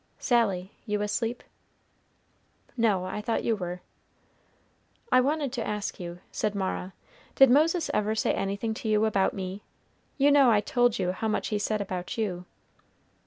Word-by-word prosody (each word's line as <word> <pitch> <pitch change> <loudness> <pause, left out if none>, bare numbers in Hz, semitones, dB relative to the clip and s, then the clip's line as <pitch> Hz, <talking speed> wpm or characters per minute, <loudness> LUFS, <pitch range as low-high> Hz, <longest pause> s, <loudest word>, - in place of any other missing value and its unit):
"Sally, 200 -7 +1 0.2
you 210 0 0
asleep?" 230 +3 -2 1.3
"No, 210 -7 +2
I 210 - -4
thought 225 +2 -1
you 230 - +1
were." 180 -2 -5 1.3
"I 255 - +6
wanted 285 0 -1
to 240 -3 -2
ask 210 -1 -3
you," 175 0 -7
said 210 -1 -2
Mara, 190 -1 -3 0.4
"did 270 -2 +7
Moses 320 +4 +3
ever 210 +1 +1
say 215 - +1
anything 200 +3 -2
to 220 0 -4
you 215 0 +3
about 195 -3 +1
me? 190 +1 -5 0.6
you 285 0 +4
know 280 -3 +6
I 215 -3 +5
told 245 +2 +1
you 180 -5 0
how 205 +4 -3
much 215 - -1
he 210 - -1
said 215 0 -1
about 185 +4 -4
you." 185 -5 -2
210 Hz, 160 wpm, -27 LUFS, 195-240 Hz, 1.3 s, did